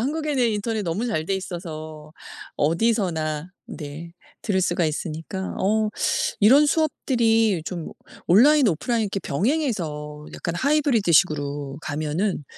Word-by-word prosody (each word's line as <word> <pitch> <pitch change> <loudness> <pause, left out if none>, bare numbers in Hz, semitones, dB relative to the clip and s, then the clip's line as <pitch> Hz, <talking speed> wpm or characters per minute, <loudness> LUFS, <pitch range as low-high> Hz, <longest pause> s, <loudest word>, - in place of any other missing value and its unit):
한국에는 285 -1 0
인터넷 215 0 -2
너무 190 +7 -2
잘 160 -9 -1
돼 195 - -1
있어서 155 -5 -7 0.4
어디서나 165 -3 0 0.2
네 155 +2 -8 0.3
들을 190 -4 +1
수가 175 -1 +1
있으니까 160 +4 -4
어 215 +2 +1 0.5
이런 270 +8 +6
수업들이 225 - +2
좀 170 -2 -5 0.4
온라인 265 - +6
오프라인 225 +7 0
이렇게 200 -1 -2
병행해서 155 - -2
약간 170 - -4
하이브리드식으로 170 - +1
가면은 155 +5 -2
190 Hz, 295 characters per minute, -23 LUFS, 155-230 Hz, 0.5 s, 이런